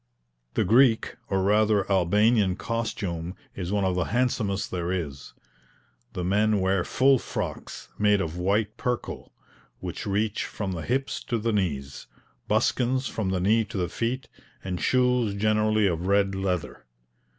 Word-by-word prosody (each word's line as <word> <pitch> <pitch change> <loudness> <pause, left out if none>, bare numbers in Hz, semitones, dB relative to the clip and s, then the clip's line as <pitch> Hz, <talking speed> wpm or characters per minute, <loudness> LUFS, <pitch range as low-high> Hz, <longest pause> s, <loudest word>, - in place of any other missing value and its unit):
The - - +3
Greek 115 +3 +4
or 95 -1 +1
rather 105 +1 +3
Albanian 100 +2 +3
costume 100 -7 -3 0.2
is 90 -1 -5
one 100 -1 +1
of 95 - +1
the 90 -2 0
handsomest 110 -4 0
there 90 -1 -2
is. 75 -7 -4 0.8
The 90 - -3
men 105 +3 +2
wear 95 -1 +1
full 135 +5 +3
frocks, - - -5
made 105 -1 +4
of 85 -3 -3
white 100 +4 0
perkal, 125 -1 -3 0.5
which - - -6
reach 105 +1 0
from 100 -3 -4
the 85 -3 -4
hips 135 +6 -2
to 120 - -1
the 115 +1 -1
knees, 70 -9 -2 0.4
buskins 130 +1 +1
from 105 -4 -2
the 95 -1 0
knee 110 +5 +3
to 100 - -7
the 90 -2 -1
feet, 120 +6 -2 0.4
and 90 -2 -4
shoes 125 -4 +2
generally 110 +1 +2
of 90 -1 0
red 100 0 +3
leather. 90 -9 -3
100 Hz, 150 wpm, -26 LUFS, 90-110 Hz, 0.8 s, Greek